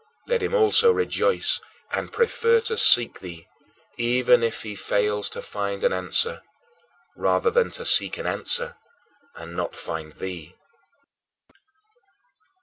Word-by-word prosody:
Let 485 -2 -1
him 430 - -2
also 460 +1 +5
rejoice 455 +1 0 0.3
and - - -4
prefer 465 +1 +2
to 455 0 -3
seek 120 - +5
thee, 85 -3 -11 0.5
even 120 0 +3
if 115 -1 -2
he 105 -2 -7
fails 105 +1 -1
to - - -8
find 100 -1 -5
an - - +2
answer, 95 - 0 0.7
rather 460 - +1
than 475 0 +2
to 480 -1 -6
seek - - +4
an - - -7
answer 485 0 0 0.6
and 85 +1 -10
not - - -4
find 80 -2 -7
thee! 90 -2 -8
125 Hz, 130 wpm, -23 LUFS, -, 0.7 s, also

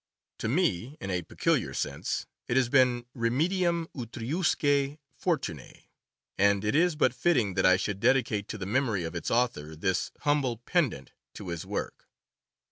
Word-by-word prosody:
To - - -2
me, 140 - 0
in 95 - -4
a 90 -1 0
peculiar 80 - 0
sense, - - -2 0.2
it 120 - +1
has 130 -2 +3
been 125 -2 +3
remedium 170 +8 +1
utriusque 140 +3 0 0.3
jortunoe; 135 - -2 0.6
and 100 +1 +3
it 105 - +1
is 170 +1 +3
but 150 - +2
fitting 125 - +2
that 95 0 +3
I 95 0 +6
should 100 0 -3
dedicate 115 -3 +2
to - - -5
the 95 - -5
memory 110 -3 0
of 80 - -4
its 85 - -3
author 80 -11 0
this 95 +3 0
humble 140 -5 +1
pendant 120 - -1 0.2
to 95 - -7
his 85 -2 -5
work. - - -5
120 Hz, 155 wpm, -28 LUFS, 95-145 Hz, 0.6 s, I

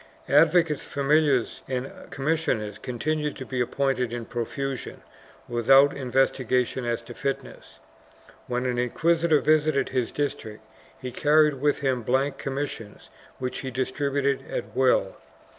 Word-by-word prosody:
Advocates, 155 +1 +4
familiars 140 -2 +1
and 130 0 -3 0.2
commissioners 135 -8 -1
continued 150 +4 -2
to 130 - -7
be 130 -1 -2
appointed 125 -1 0
in 120 -1 -4
profusion, 130 +3 -4 0.4
with 120 0 -3
out 135 +1 +7
investigation 130 -1 0
as 120 0 -2
to 120 - -10
fitness. 135 +2 -5 0.7
When 125 0 -2
an 125 -1 0
inquisitor 160 +5 +2
visited 155 -3 +2
his 130 -3 -1
district 110 -7 -4 0.4
he 130 -1 -6
carried 150 0 +3
with 145 0 +1
him 130 -3 0
blank 135 +4 0
commissions 135 -6 -5 0.3
which 125 -1 -4
he 130 - -4
dis 130 0 -2
tributed 140 -1 0
at - - -5
will. 125 -7 +2
135 Hz, 130 wpm, -25 LUFS, 125-145 Hz, 0.7 s, out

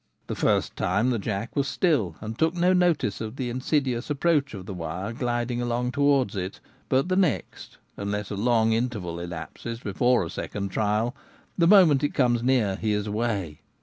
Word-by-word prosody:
The - - -4
first - - +1
time 105 +8 +1
the 120 - 0
jack 105 +2 -4
was 140 -2 +1
still 135 - +1
and 110 +1 -5
took 160 +6 +1
no 180 +1 +3
notice 175 - +1
of 110 +1 -5
the 125 -3 -3
insidious 130 -1 -1
approach 145 -3 +1
of 95 -2 -8
the 95 - -6
wire 90 +5 -4
gliding 120 -1 -1
along 120 +1 -1
towards 140 -6 +2
it; 95 0 -4 0.3
but 130 +5 +2
the 185 - +1
next 180 - -1
— - - -40
unless 100 +1 -3
a - - -2
long 110 +1 +2
interval 110 -8 -2
elapses 85 +7 -6
before 120 0 +1
a 80 - -7
second 100 +1 -4
trial 110 +4 0 0.2
— - - -33
the 170 - +5
moment 175 -8 +6
it 145 - -1
comes 120 -3 +2
near 120 -6 +2
he 110 -1 0
is 105 -1 -1
away. 105 -7 -2
120 Hz, 190 wpm, -26 LUFS, 100-135 Hz, 0.3 s, moment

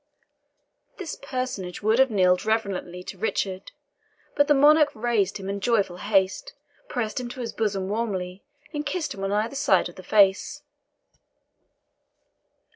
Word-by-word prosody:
This 370 -5 -5
personage 255 -10 -5
would 220 +3 +3
have 265 0 +5
kneeled 185 -4 +3
reverently 195 -5 -2
to 185 - -9
Richard, 195 -3 -2 0.6
but 285 -1 +3
the 295 - +5
Monarch 300 +2 +6
raised 215 -4 0
him 195 -1 -8
in 200 0 -3
joyful 200 -5 +1
haste, 205 - 0 0.4
pressed 240 0 -2
him 245 -1 -5
to 255 - -9
his 235 -2 -4
bosom 200 -4 -1
warmly, 195 -4 -3 0.3
and 295 -1 -2
kissed 305 +2 -3
him 195 - -7
on 195 - -1
either 215 +5 0
side 190 -11 +2
of 175 - -16
the - - -8
face. 210 +10 +2
215 Hz, 145 wpm, -25 LUFS, 190-255 Hz, 0.6 s, Monarch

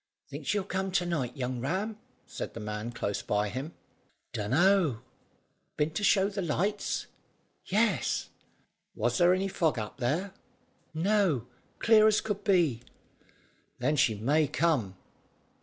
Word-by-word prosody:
"Think - - -7
she'll 205 -2 +1
come 190 0 -2
to 180 -2 +2
night, 150 -7 -2
young 125 -1 -2
Ram?" 195 - -2 0.3
said - - -6
the - - -5
man 105 +2 -4
close 100 -4 -3
by 105 0 0
him. 135 +9 -6 0.6
"Dunno." 140 - +2 0.7
"Been 150 +1 +1
to 185 +7 -3
show 195 -1 +4
the 200 -1 -3
lights?" 190 +5 -1 0.6
"Yes." 205 - +1 0.7
"Was 120 0 0
there 175 0 +6
any 185 +1 +1
fog 165 -7 0
up 105 -1 -5
there?" 155 +11 -1 0.6
"No; 175 - +2 0.3
clear 220 -1 +6
as 215 -1 +4
could 205 -2 -3
be." 170 - +2 1.0
"Then 145 +5 +1
she 135 -6 +3
may 145 +9 +2
come. 130 - 0
160 Hz, 135 wpm, -29 LUFS, 125-195 Hz, 1.0 s, there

